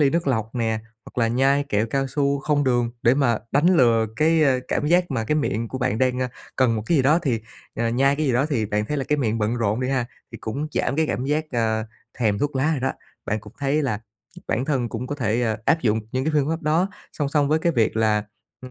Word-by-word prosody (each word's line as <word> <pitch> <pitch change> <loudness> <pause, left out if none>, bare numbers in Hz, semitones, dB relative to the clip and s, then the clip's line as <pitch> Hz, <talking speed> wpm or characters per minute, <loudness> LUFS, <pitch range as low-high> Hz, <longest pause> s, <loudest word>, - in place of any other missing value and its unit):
ly 140 -2 +4
nước 170 -1 0
lọc 110 -3 -1
nè, 110 -2 0 0.3
hoặc - - -9
là 115 - +3
nhai 135 +4 +2
kẹo 105 +2 +1
cao 135 +3 -1
su 140 +1 0
không 145 0 +1
đường 120 -2 +1
để 120 +3 +5
mà 120 -6 +2
đánh 145 +5 +3
lừa 115 -4 +4
cái, 160 +1 +3
ơ, 130 -3 +3
cảm 150 - 0
giác 175 0 +3
mà 115 -4 -1
cái 150 - 0
miệng 115 -6 -1
của 130 - -5
bạn 110 -3 0
đang, 130 -1 +1
a, 125 - -1 0.3
cần 120 -4 +3
một 105 - -3
cái 170 - +3
gì 135 - +4
đó 150 +5 +4
thì, 120 -7 0 0.3
ờ, 115 +1 0
nhai 135 +4 +2
cái 155 -1 0
gì 130 - +2
đó 130 +5 +2
thì 115 -9 -1
bạn 105 +1 -1
thấy 150 - -2
là 135 - -1
cái 150 0 0
miệng 115 -4 0
bận 110 +2 0
rộn 110 +1 0
đi 130 - -1
ha, 130 -3 0 0.3
thì - - -7
cũng 140 +7 -4
giảm 140 - 0
cái 160 -1 +2
cảm 130 - -2
giác, 150 +3 0
ơ, 110 -2 0 0.3
thèm 105 -4 +1
thuốc 145 +2 -1
lá 145 +4 +2
rồi 140 - -2
đó. 135 - 0 0.3
Bạn 110 0 -1
cũng 105 -1 -13
thấy 145 +2 +1
là 110 -6 -1 0.5
bản 125 +4 0
thân 130 -5 0
cũng 120 +3 -5
có 145 - -3
thể, 120 -3 0
ơ, 110 -1 0
áp 165 0 +3
dụng 110 -1 +1
những 130 +1 -1
cái 155 - 0
phương 145 0 +2
pháp 165 0 -2
đó 160 +5 +2 0.2
song 145 -2 -2
song 145 -1 +2
với 155 +1 +3
cái 170 +1 +1
việc 115 -3 +1
là, 110 -1 +2 0.4
ưm 130 - -9
130 Hz, 270 wpm, -23 LUFS, 115-145 Hz, 0.5 s, để